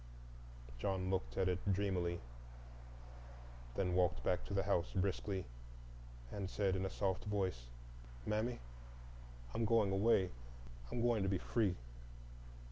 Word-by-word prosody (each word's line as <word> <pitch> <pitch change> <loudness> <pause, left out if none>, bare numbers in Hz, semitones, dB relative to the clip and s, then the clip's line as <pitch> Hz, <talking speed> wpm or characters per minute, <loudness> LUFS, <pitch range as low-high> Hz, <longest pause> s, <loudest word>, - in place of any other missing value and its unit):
John 95 +3 0
looked 60 -11 -1
at 95 - +3
it 90 -1 +1
dreamily, 90 -3 0 1.5
then 90 -2 +1
walked 90 -1 +2
back 90 - +1
to - - -6
the 95 - +3
house 90 -3 +1
briskly, 95 0 0 0.9
and 100 -2 -3
said 95 -2 +1
in 95 0 0
a - - -4
soft 95 0 -1
voice, 95 -12 -1 0.6
"Mammy, 110 +3 0 1.0
I'm 115 - 0
going 110 -3 +4
away—I'm - - 0
going 120 -3 +3
to 95 - +2
be 95 - +2
free." 100 -1 +1
95 Hz, 125 wpm, -38 LUFS, 90-100 Hz, 1.5 s, going